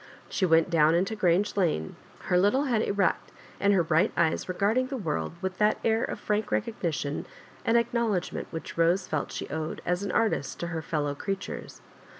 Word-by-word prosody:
She 190 - +1
went 165 +1 +4
down 160 -1 +4
into 195 +5 +1
Grange 190 0 +2
Lane, 160 - 0 0.3
her - - 0
little 205 +9 +3
head 240 -6 +1
erect, 200 -3 0 0.3
and 200 - +3
her 190 -4 +4
bright 160 +1 +2
eyes 165 +2 +1
regard 200 +6 +2
ing 255 - 0
the 270 0 -4
world 155 - -2
with 190 0 -3
that 210 0 +3
air 225 +1 +2
of - - -3
frank 210 0 -1
recognition 150 - -2 0.4
and 230 +1 +3
acknowledgment 235 -6 0
which 160 - -7
Bose 170 +3 +2
felt 155 - -2
she - - -5
owed 160 +1 -3
as 180 +1 0
an 200 - -2
artist 225 - 0
to 170 - -2
her 160 - -2
fellow 150 -2 -1
creatures. 195 +6 -5
185 Hz, 185 wpm, -28 LUFS, 160-210 Hz, 0.4 s, went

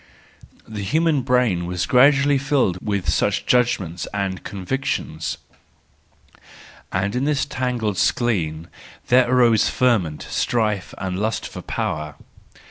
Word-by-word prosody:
The 110 -2 -6
human 155 +8 +1
brain 125 -9 +1
was 90 -1 -2
gradually 140 - +4
filled 130 -10 +1
with 100 -3 -2
such 100 -1 +1
judgments 95 -9 +1
and 100 -2 -3
convictions; 110 +7 -3 1.5
and 100 +4 -1
in 130 +2 0
this 150 -2 +1
tangled 120 -6 -2
skein 85 -9 0 0.4
there 125 0 +5
arose 120 -4 +4
ferment, 105 -12 +1
strife 105 -5 -1
and 95 -1 -3
lust 110 +2 -2
for - - -8
power. 75 -1 -3
110 Hz, 115 wpm, -21 LUFS, 95-125 Hz, 1.5 s, there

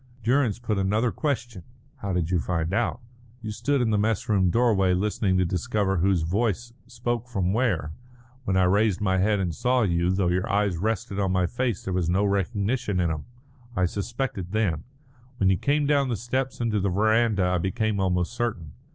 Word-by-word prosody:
Durrance 120 -2 +2
put 110 -4 -2
another 105 +5 +1
question: 120 - -3 0.4
"How 100 - -4
did 90 -2 -1
you 90 - +2
find 85 +1 -2
out?" 120 +2 0 0.4
"You 110 - -4
stood 140 +5 0
in 115 -2 +1
the 105 - +2
mess 110 +3 0
room 95 -5 +3
doorway 100 -4 +3
listening 100 0 0
to 90 - +2
discover 95 +3 0
whose 90 -1 +2
voice 110 +6 -1
spoke 120 0 -3
from 95 -6 -1
where. 100 - 0 0.5
When 95 -5 0
I 95 - +4
raised 100 +2 +2
my 95 -3 +1
head 105 +2 +2
and 90 -3 -1
saw 125 - +1
you, 85 -3 +1
though 95 -1 +1
your 90 +5 0
eyes 100 -3 +1
rested 100 0 -2
on 95 -2 +1
my 90 -1 +2
face 120 +1 -2
there 95 - -3
was 90 -2 0
no 95 +3 +2
recognition 100 +2 0
in 85 -2 +1
them. 75 -2 -4 0.5
I 90 - +2
suspected 100 -1 -3
then. 95 -8 0 0.5
When 95 -3 +3
you 95 - +2
came 145 - +1
down 140 -2 +2
the 120 - 0
steps 130 +5 -2
into 115 -3 0
the 100 0 0
verandah 110 +1 +2
I 90 0 +1
became 100 +4 -1
almost 90 +1 0
certain. 110 -11 -3
100 Hz, 195 wpm, -25 LUFS, 90-115 Hz, 0.5 s, I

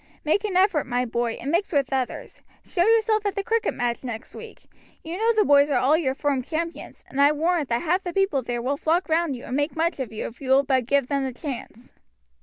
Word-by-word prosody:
Make 350 +7 +2
an 385 -4 0
effort, 370 -7 +2
my 245 0 0
boy, 235 0 -1
and 275 +5 -5
mix 350 +4 0
with 280 -4 0
others. 260 -2 -3 0.2
Show 350 - 0
yourself 440 0 +3
at 405 - -2
the 400 - -2
cricket 455 +2 0
match 240 0 -2
next 230 -3 -7
week. - - -11 0.4
You 325 +2 -5
know 450 +4 +2
the 430 - +3
boys 285 0 +5
are 285 - +2
all 280 +4 +4
your 270 -5 0
firm 280 -2 0
champions, 330 +5 -5
and 275 - -1
I 285 +1 +6
warrant 315 -1 0
that 235 +4 0
half 355 +3 +1
the 355 - -4
people 390 -7 +1
there 240 -1 -4
will 275 +3 -1
flock 335 +4 0
round 320 -3 +1
you 245 - -10
and 250 - -4
make 290 +3 -1
much 330 -1 0
of 260 - -4
you 220 - -5
if 230 - -9
you 265 - -6
will 270 +1 +5
but 260 -3 0
give 280 -1 +2
them 275 +1 -1
the 260 -1 -3
chance." 250 -4 -7
285 Hz, 245 wpm, -24 LUFS, 260-345 Hz, 0.4 s, I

